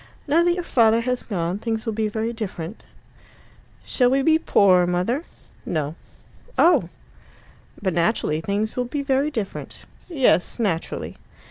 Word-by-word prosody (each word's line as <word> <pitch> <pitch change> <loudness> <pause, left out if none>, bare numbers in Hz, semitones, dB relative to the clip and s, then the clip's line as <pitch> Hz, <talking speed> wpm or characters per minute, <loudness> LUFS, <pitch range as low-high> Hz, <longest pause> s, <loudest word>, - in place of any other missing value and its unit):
"Now 320 +4 +4
that 345 0 +2
your 355 - -3
father 230 -6 +3
has 250 +1 -1
gone, 180 -2 -3
things 225 0 -3
will 225 - -2
be 215 0 0
very 220 +2 -2
different." 200 -4 -6 1.0
"Shall 250 -2 +2
we 270 +1 +2
be 320 +2 +4
poorer, 185 - +4
mother?" 185 - -1 0.4
No. 155 -2 -2 0.6
"Oh!" 295 - +4 0.9
"But 190 -3 -1
naturally 170 -3 0
things 205 +5 -2
will 250 - -1
be 280 +3 -3
very 275 +1 +1
different." 220 -9 -6 0.3
"Yes, 270 - +2
naturally." 195 -8 -2
225 Hz, 140 wpm, -23 LUFS, 185-265 Hz, 1.0 s, Now